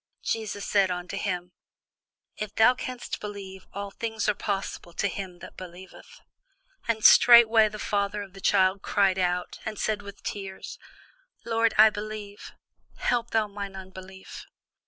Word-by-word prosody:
Jesus 215 -3 -3
said 200 -2 +3
unto 180 0 -4
him, 180 -3 -3 0.8
If 215 -1 -6
thou 225 +3 +6
canst 255 -2 -6
believe, 195 -2 -8
all 200 0 -6
things 225 0 -3
are 210 - +3
possible 195 -4 -4
to 200 - 0
him 190 -2 -6
that 185 - -11
believeth. 185 0 -12 0.7
And 220 -2 0
straightway 230 -2 +8
the 215 - -8
father 205 0 -1
of 195 -2 -13
the 195 - -12
child 190 0 +3
cried 195 -3 +2
out, 180 0 -1
and 215 -1 -5
said 215 0 -1
with 200 0 -11
tears, 195 -2 -6 0.7
Lord, 230 -1 +1
I 215 +1 +8
believe; 210 -1 -7 0.4
help 235 -1 0
thou 220 -1 +1
mine 200 -1 -7
unbelief. 190 0 -10
200 Hz, 145 wpm, -27 LUFS, 190-215 Hz, 0.8 s, straightway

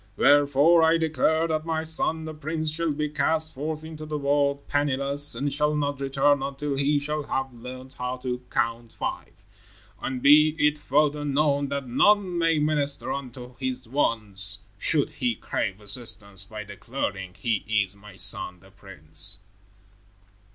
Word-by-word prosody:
Wherefore, 145 +3 +5
I 160 +1 +5
declare 160 0 +1
that 155 -1 -1
my 160 -1 -1
son, 160 0 -1
the 155 - -6
prince, 155 +1 -2
shall 165 +1 0
be 150 +1 -1
cast 155 +2 +1
forth 155 +3 -4
into 160 -1 -8
the 155 0 -3
world, 140 0 +1
penniless, 145 0 +1
and 140 0 -1
shall 150 +1 +1
not 145 -2 -1
return 135 +1 +2
until 140 +1 -3
he 140 +2 +2
shall 150 +1 -2
have 135 -2 -3
learned 130 +2 -9
how 125 +1 -2
to 125 -1 -4
Count 115 0 -1
Five. - - -5 0.7
And 130 -1 -3
be 150 +2 +7
it 150 -1 +2
further 150 +1 +1
known 145 0 +1
that 140 -1 -3
none 185 +7 +3
may 165 -1 +3
minister 150 -2 0
unto 125 -2 -7
his 130 -1 -4
wants 105 -7 -1 0.2
should 150 +5 +2
he 125 -4 -1
crave 100 -1 -3
assistance 100 -3 -2
by 105 +1 -7
declaring 100 -3 -5
he 115 +2 0 0.3
is 95 - -18
my 100 -1 -14
son, 90 -1 -2
the 95 +1 -19
prince." 95 -2 -2
140 Hz, 155 wpm, -26 LUFS, 125-150 Hz, 0.7 s, be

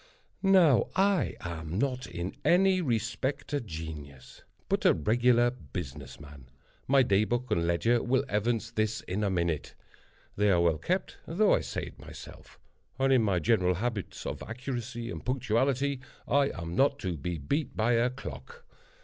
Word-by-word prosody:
Now 185 - +5
I 195 -1 +2
am 85 0 -5
not 130 -1 -1
in 85 +1 -5
any 185 +1 +4
respect 120 +1 -2
a 145 - +1
genius, 80 - -9 0.3
but - - 0
a - - +5
regular 120 +7 +3
business 75 - -8
man. 70 -4 -13 0.4
My 135 0 +5
day 100 -3 +3
book 120 +2 -2
and 85 -4 +1
ledger 115 +8 +2
will 130 +2 +1
evince 115 +2 -1
this 110 -1 -1
in 100 +4 -3
a 100 - +1
minute. 85 -6 -1 0.6
They 105 +1 +2
are 90 -3 +4
well 85 -2 +2
kept, 185 +1 -2
though 200 +6 +3
I - - +3
say - - -4
it - - -9
myself; - - -12 0.4
and, 135 0 +3
in 130 - +5
my 100 -4 +1
general 90 +1 +2
habits 110 0 -4
of - - -4
accuracy 120 -1 -5
and 80 - -7
punctuality, 130 +2 0 0.3
I 140 0 +3
am 85 0 -6
not 140 +4 +3
to 90 -3 -2
be 85 +3 -4
beat 140 - -2
by 110 +2 +2
a 120 +2 +3
clock. 475 - -9
115 Hz, 165 wpm, -29 LUFS, 85-130 Hz, 0.6 s, Now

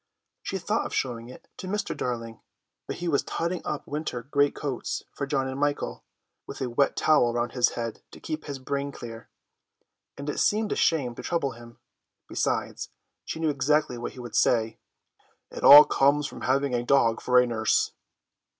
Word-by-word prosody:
She - - -3
thought - - -1
of - - -6
showing 120 -2 -2
it 125 - -13
to 185 - -7
Mr. 205 +2 -2
Darling, 115 -2 -4 0.5
but - - -4
he 175 - -5
was 145 -4 +2
totting 170 +2 -3
up 150 - -4
winter 145 -5 -4
great 145 +2 +1
coats 135 -4 -4
for 140 - -4
John 135 -1 0
and 130 +1 -5
Michael, 145 0 -1 0.4
with - - -8
a 130 -2 -3
wet 140 +4 +2
towel 150 -6 +3
around 120 0 -1
his 125 -2 +2
head 115 -2 -4
to - - -13
keep 155 -1 -5
his 140 -2 -5
brain 140 +2 -3
clear, 115 -3 -9 0.9
and 140 - -7
it 150 - -2
seemed 215 0 +1
a - - +1
shame 140 -7 +1
to - - -8
trouble 165 -6 -1
him; 115 0 -13 0.5
besides, - - -2 0.4
she - - -5
knew 160 -1 +1
exactly 140 -2 +1
what 120 - -5
he 130 - -12
would 120 -1 -8
say: 110 -2 +2 0.7
"It - - -8
all 145 +1 +12
comes 145 0 +2
of - - -10
having 135 +1 +1
a 120 - +1
dog 120 -3 +3
for 125 0 +4
a 125 - +4
nurse." 110 -2 +1
135 Hz, 185 wpm, -26 LUFS, 120-150 Hz, 0.9 s, all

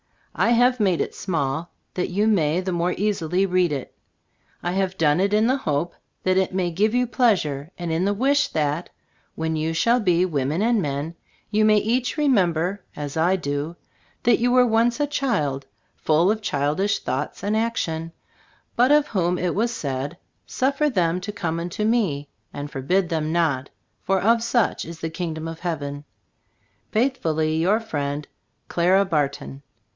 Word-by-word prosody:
I 235 - +2
have 245 +1 +4
made 190 -5 +2
it - - -3
small, 160 -2 -2 0.2
that 180 - -2
you 200 +4 +1
may 175 -6 +2
the 185 0 -3
more 175 +1 0
easily 190 -3 0
read 180 -3 +2
it. 140 -3 -4 0.7
I 175 - -1
have 190 0 -1
done 150 0 +3
it 200 +2 +1
in 215 +1 +4
the 260 +3 +2
hope 160 - -1 0.3
that 185 0 +2
it 190 -1 +1
may 180 -2 0
give 210 +7 +1
you 250 0 +3
pleasure, 190 - +1
and 175 -2 -4
in 165 +3 +1
the 200 - +2
wish 280 +7 +2
that, 150 +2 -1 0.5
when 160 0 -2
you 160 +1 -1
shall 235 +9 +3
be 180 -4 +2
women 150 +2 -1
and 230 -2 +2
men, 145 +1 -3 0.4
you 215 0 +3
may 215 0 +5
each 235 +5 0
remember, 190 - +1
as 145 -1 -5
I 170 +4 +3
do, 145 -1 -3 0.5
that 240 -1 +4
you 245 +1 +2
were 250 0 +5
once 235 +2 +2
a 290 - +2
child, 210 - -1 0.3
full 165 +5 +3
of 220 0 -2
childish 155 +3 0
thoughts - - -4
and 205 +2 0
action, 165 -8 -1 0.6
but 250 +3 +4
of 295 0 +4
whom 180 -3 0
it 175 -1 -1
was 230 +4 +1
said, 140 - -4 0.3
"Suf 270 +2 -1
fer 300 0 +3
them 180 - +1
to 205 +3 -4
come 170 -5 -3
unto 175 +5 -3
Me, 200 -11 +1 0.2
and 145 +1 -6
forbid 175 +7 0
them 160 -2 -1
not, 155 -6 0 0.3
for 195 0 +1
of 230 +4 +3
such 235 -1 +1
is 165 0 -9
the 160 - -3
Kingdom 165 -2 -4
of 165 0 -7
Heaven." 145 -4 -4 0.9
Faithfully 160 - +1
your 190 +7 +3
friend, 145 -9 -3 0.4
CLARA 185 +3 +3
BARTON. 140 -5 -2
180 Hz, 175 wpm, -23 LUFS, 160-215 Hz, 0.9 s, may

